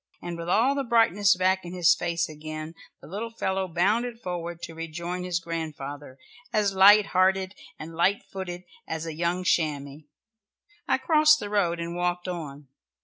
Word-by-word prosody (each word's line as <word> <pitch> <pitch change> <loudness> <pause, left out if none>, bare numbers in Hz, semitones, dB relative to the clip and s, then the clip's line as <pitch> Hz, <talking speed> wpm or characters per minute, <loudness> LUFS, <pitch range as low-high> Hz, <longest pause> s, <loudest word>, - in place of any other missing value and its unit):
And 175 -1 -6
with 170 0 -6
all 235 +9 +3
the 280 -1 -1
brightness 205 -5 +4
back 185 +1 +1
in 175 0 -8
his 175 -1 +5
face 170 -1 -1
again, 155 +1 -7 0.3
the - - -11
little 210 +7 -5
fellow 190 -4 -2
bounded 215 +8 0
forward 175 -4 -5
to 165 - -6
rejoin 170 +2 -5
his 180 -1 -1
grandfather, 145 -5 -6 0.3
as 205 -2 +1
light 200 +2 +7
hearted 190 0 +2 0.2
and 160 +2 -8
light 195 +7 +1
footed 180 -2 -7 0.2
as 160 0 -4
a 165 - -5
young 170 +3 -1
chamois. 145 -4 0 0.9
I - - +3
crossed 305 -1 +4
the 205 - -6
road 175 -5 +1
and 170 0 -4
walked 175 0 -1
on. 150 -5 -6
175 Hz, 165 wpm, -26 LUFS, 165-195 Hz, 0.9 s, light